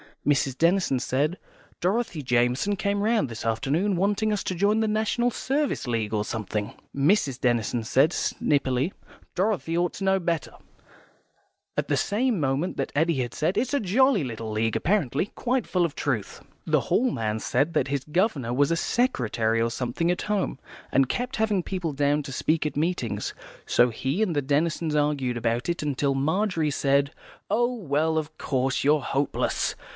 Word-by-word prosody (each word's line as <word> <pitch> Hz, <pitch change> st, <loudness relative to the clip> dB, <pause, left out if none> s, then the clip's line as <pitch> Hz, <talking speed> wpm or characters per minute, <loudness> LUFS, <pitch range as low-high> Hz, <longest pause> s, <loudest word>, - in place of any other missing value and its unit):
Miss 140 Hz, -2 st, +2 dB
Denison 165 Hz, -3 st, +2 dB
said, 145 Hz, +7 st, 0 dB, 0.4 s
"Dorothy 190 Hz, -3 st, 0 dB
Jamison 125 Hz, +9 st, +1 dB
came 200 Hz, +1 st, -1 dB
round 220 Hz, -8 st, +2 dB
this 115 Hz, -3 st, -7 dB
afternoon, 145 Hz, -, +1 dB
wanting 205 Hz, +4 st, +1 dB
us 205 Hz, -, -2 dB
to -, -, -2 dB
join 205 Hz, +5 st, +2 dB
the 220 Hz, -, +1 dB
National 220 Hz, +3 st, +1 dB
Service 280 Hz, -, -1 dB
League 115 Hz, -3 st, -1 dB
or 105 Hz, -1 st, +1 dB
something." 105 Hz, -1 st, -3 dB, 0.2 s
Mrs. 140 Hz, -, +2 dB
Denison 120 Hz, -2 st, 0 dB
said, 135 Hz, +7 st, +3 dB
snippily, 140 Hz, +2 st, 0 dB, 0.4 s
"Dorothy 185 Hz, -4 st, 0 dB
ought 175 Hz, 0 st, +1 dB
to 195 Hz, -, -6 dB
know 190 Hz, 0 st, +3 dB
better," 170 Hz, -3 st, -2 dB, 1.2 s
at -, -, -1 dB
the -, -, +1 dB
same 225 Hz, 0 st, +1 dB
moment 140 Hz, +5 st, -1 dB
that 135 Hz, -, -2 dB
Eddy 145 Hz, -5 st, +1 dB
said, 160 Hz, +7 st, -1 dB
"It's 250 Hz, +2 st, 0 dB
a 285 Hz, -, +3 dB
jolly 230 Hz, -, +3 dB
little 115 Hz, -3 st, -5 dB
League, 110 Hz, +1 st, 0 dB
apparently. 175 Hz, -, +1 dB
Quite 250 Hz, -2 st, 0 dB
full 180 Hz, -2 st, +2 dB
of 160 Hz, -, -4 dB
truth." 115 Hz, -9 st, -2 dB, 0.2 s
The -, -, +2 dB
Hall 255 Hz, +3 st, +2 dB
man 110 Hz, -, -2 dB
said 145 Hz, +9 st, 0 dB
that 135 Hz, -, +1 dB
his 140 Hz, -1 st, -2 dB
governor 150 Hz, -, 0 dB
was 140 Hz, +2 st, +3 dB
a 165 Hz, -, +2 dB
secretary 115 Hz, -, 0 dB
or 115 Hz, 0 st, +1 dB
something 125 Hz, +8 st, -1 dB
at 180 Hz, -, -2 dB
home, 205 Hz, -9 st, -1 dB, 0.3 s
and 135 Hz, -1 st, +3 dB
kept 245 Hz, +1 st, -2 dB
having 215 Hz, -4 st, +1 dB
people 175 Hz, -5 st, -3 dB
down 145 Hz, +1 st, +1 dB
to 140 Hz, -, -7 dB
speak 155 Hz, +4 st, 0 dB
at 150 Hz, -, -6 dB
meetings. 175 Hz, +4 st, -1 dB, 0.3 s
So 125 Hz, -, +4 dB
he 135 Hz, -, -2 dB
and 185 Hz, -7 st, +1 dB
the 145 Hz, -, +1 dB
Denisons 155 Hz, +3 st, 0 dB
argued 145 Hz, -5 st, 0 dB
about 115 Hz, +2 st, -1 dB
it, 170 Hz, -, -1 dB, 0.2 s
till 140 Hz, -1 st, +1 dB
Margery 160 Hz, +2 st, +1 dB
said, 140 Hz, +1 st, +2 dB, 0.4 s
"Oh, 240 Hz, +4 st, +2 dB
well, 160 Hz, -, 0 dB
of 155 Hz, 0 st, -7 dB
course, 130 Hz, -2 st, 0 dB
you're 150 Hz, +1 st, +4 dB
hopeless. 140 Hz, +1 st, -1 dB
150 Hz, 170 wpm, -26 LUFS, 130-195 Hz, 1.2 s, So